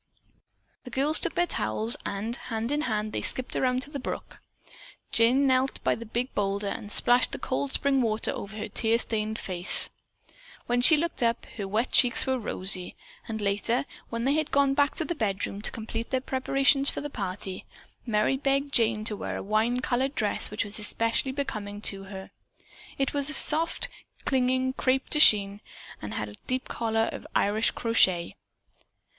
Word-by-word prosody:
The 250 - -10
girls 280 +5 +3
took 340 - -2
their 350 - +2
towels 110 - -1
and 210 +4 -4
hand 230 +1 -4
in 295 +1 0
hand 215 0 -2
they - - -2
skipped 255 - +2
around 255 0 0
to 285 - -12
the 285 - -5
brook. 255 - -7 0.7
Jane 245 +5 +3
knelt 260 0 +1
by - - +2
the 230 -1 -8
big 240 +4 -3
boulder 200 0 -2
and 205 +1 -7
splashed 245 +3 +3
the - - -2
cold 265 +1 -3
spring 275 -1 +1
water 220 -2 -1
over 200 +2 -7
her 215 - -4
tear 225 0 +2
stained 220 -1 -1
eyes. 180 -1 +5 0.7
When 245 0 0
she 310 +5 +6
looked 335 -1 -3
up 235 0 0
her 200 -3 -5
wet 220 +5 -1
cheeks 245 -2 +6
were 260 -1 -1
rosy. 185 -4 -2 0.3
And 220 -1 -4
later, 205 +5 0 0.2
when 230 0 -4
they 270 +3 +2
had 310 0 -1
gone 280 -1 +2
back 285 +1 +1
to 325 - -3
the 345 - -2
bedroom 200 - -3
to - - 0
complete 225 0 -6
their 260 - 0
preparations 275 +2 +2
for - - -4
the 290 0 -6
party, 190 -3 -6 0.4
Merry 225 +3 0
begged 275 0 -1
Jane 220 -2 +2
to 215 - -1
wear - - -5
a - - -6
wine 220 +4 0
colored 260 +3 -1
dress 210 -2 -1
which 210 - -2
was 205 +1 -6
especially 230 +5 -1
becoming 215 -7 -5
to 195 -2 -1
her. 190 -1 -10 0.7
It 270 -1 -1
was 285 0 +2
of 305 - +1
soft, 330 +10 +4 0.4
clinging 260 0 +1
crepe 265 0 -1
de 300 - +3
chine 205 -6 +7 0.4
and 105 0 -6
had 105 - -3
a 105 - -11
deep 255 0 -2
collar 225 -1 -1
of - - -9
Irish 215 +3 +2
crochet. 190 -7 +2
230 Hz, 185 wpm, -26 LUFS, 210-270 Hz, 0.7 s, chine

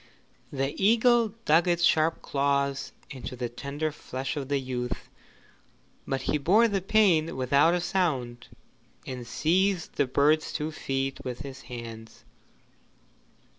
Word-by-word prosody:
The 135 0 -2
eagle 230 0 +4
dug 165 +4 +4
its 175 0 +1
sharp 160 -1 +3
claws 140 0 0 0.2
into 130 -1 -7
the 120 -1 -3
tender 140 +6 -4
flesh 135 -1 -5
of 140 -2 -5
the 145 - +2
youth, 125 -2 -4 1.0
but 135 -1 -2
he 150 - 0
bore 205 +11 +4
the 200 -3 -1
pain 180 -6 +3
without 140 +6 +3
a 175 - -1
sound, 135 -11 -1 0.6
and 125 -2 -6
seized 180 +7 0
the 140 - +2
bird's 150 +4 +2
two 155 +1 -2
feet 135 -2 -3
with 125 0 -5
his 140 -1 -8
hands. 115 -2 -9
140 Hz, 135 wpm, -27 LUFS, 130-170 Hz, 1.0 s, eagle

